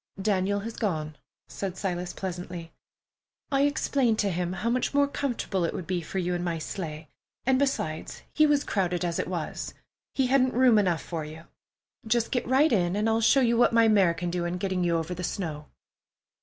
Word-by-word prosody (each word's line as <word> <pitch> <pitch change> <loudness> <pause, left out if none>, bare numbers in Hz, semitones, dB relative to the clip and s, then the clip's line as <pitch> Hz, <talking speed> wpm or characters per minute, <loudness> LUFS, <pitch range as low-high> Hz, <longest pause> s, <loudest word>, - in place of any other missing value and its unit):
"Daniel 200 0 +1
has 225 +2 -6
gone," 155 -8 -2 0.3
said 190 -2 -5
Silas 180 -2 -2
pleasantly. 175 -2 -6 0.8
"I 275 0 +3
explained 265 -5 +1
to 200 -2 +1
him 175 +1 -2
how 190 +5 -2
much 255 +3 0
more 285 0 +4
comfortable 245 -9 -2
it 165 - -1
would 180 - -5
be 180 0 -1
for 170 - -6
you 180 -1 0
in 175 0 -2
my 170 -2 -1
sleigh, 155 -2 -6 0.4
and, 260 0 +3
besides, 160 - -2
he 305 0 +5
was 290 -1 +3
crowded 180 -3 -1
as 170 -1 -1
it - - -1
was. 175 -4 -4 0.4
He 265 - +2
hadn't 255 -1 +3
room 245 -3 +6
enough 180 -5 +1
for 165 -3 -4
you. 155 +2 -9 0.6
Just 230 +1 +1
get 245 - -1
right 265 +3 +4
in, 175 -3 +2
and 210 +2 +1
I'll 225 0 +2
show 270 +4 +5
you 235 -2 +3
what 240 - +4
my 230 0 +5
mare 195 -6 +4
can 175 0 -3
do 175 0 -1
in 175 +1 -2
getting 185 -1 -1
you 170 -1 +2
over 165 +2 -3
the 180 +1 -6
snow." 155 -5 -4
190 Hz, 200 wpm, -27 LUFS, 175-235 Hz, 0.8 s, room